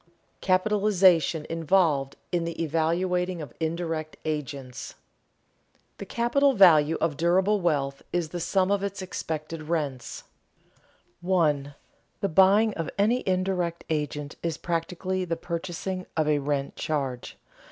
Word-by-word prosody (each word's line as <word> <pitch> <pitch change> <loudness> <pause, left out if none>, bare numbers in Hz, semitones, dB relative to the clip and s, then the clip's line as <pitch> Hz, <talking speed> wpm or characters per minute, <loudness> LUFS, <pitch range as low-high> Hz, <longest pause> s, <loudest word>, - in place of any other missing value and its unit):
CAPITALIZATION 185 -5 +3
INVOLVED 165 -4 +1 0.2
IN 175 -1 0
THE 165 0 -5
EVALUATING 170 +3 0
OF 150 - -8
INDIRECT 160 -1 -3
AGENTS 140 -5 -4 0.2
[Sidenote: - - -35 1.0
The 200 - -6
capital 270 +6 +2
value 165 - +6
of 155 -4 0
durable 190 +5 +2
wealth 140 -5 0
is 175 -3 -1
the 175 - -5
sum 190 +3 +1
of 200 -1 +2
its 200 -1 -4
expected 160 -3 -5
rents] 140 -7 -3 1.0
1. 150 -6 +1 0.5
_The 195 - 0
buying 200 +5 +5
of 165 -4 -4
any 225 +5 +2
indirect 185 -2 0
agent 150 -1 -3
is 165 -2 -2
practically 180 +2 -2
the 170 -2 -2
purchasing 180 +2 -4
of 155 -1 +2
a 150 -1 +3
"rent 140 -1 -2
charge." 135 -5 -3
170 Hz, 125 wpm, -26 LUFS, 150-185 Hz, 1.0 s, value